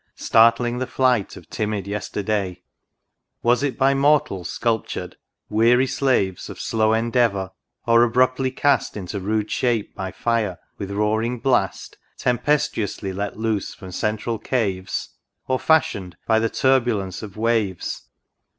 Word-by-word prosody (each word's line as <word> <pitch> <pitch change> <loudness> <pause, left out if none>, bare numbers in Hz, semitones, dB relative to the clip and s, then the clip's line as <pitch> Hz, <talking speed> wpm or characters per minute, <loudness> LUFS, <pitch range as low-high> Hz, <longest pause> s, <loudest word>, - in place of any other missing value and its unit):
Startling 115 +2 +3
the 130 - -2
flight 125 -6 +1
of - - -13
timid 105 -2 -2
Yesterday! 100 -2 -3 0.8
Was 120 +2 +3
it 140 -2 -1
by 135 +1 +4
mortals 140 - +2
sculptured? 115 -2 -2 0.2
— - - -61
weary 120 +4 +4
slaves 125 -9 0
Of - - -9
slow 110 -1 +1
endeavour! 115 -4 +1 0.3
or 115 0 +5
abruptly 130 +2 +2
cast 140 -3 +1
Into 100 +1 -5
rude 105 +2 -1
shape 120 -5 0
by 95 -1 -4
fire, 110 -6 -1 0.2
with 100 -2 -4
roaring 110 +4 0
blast 115 -6 0 0.2
Tempestuously 125 -6 0
let 100 +2 -4
loose 110 -2 -2
from 95 -1 -10
central 110 +4 -2
caves? 95 -7 -2 0.4
Or 130 0 +1
fashioned 100 - +1
by 110 -1 +3
the 115 0 +1
turbulence 120 -9 +1
of 105 -1 -9
waves. 110 -5 -1
110 Hz, 130 wpm, -22 LUFS, 100-125 Hz, 0.8 s, or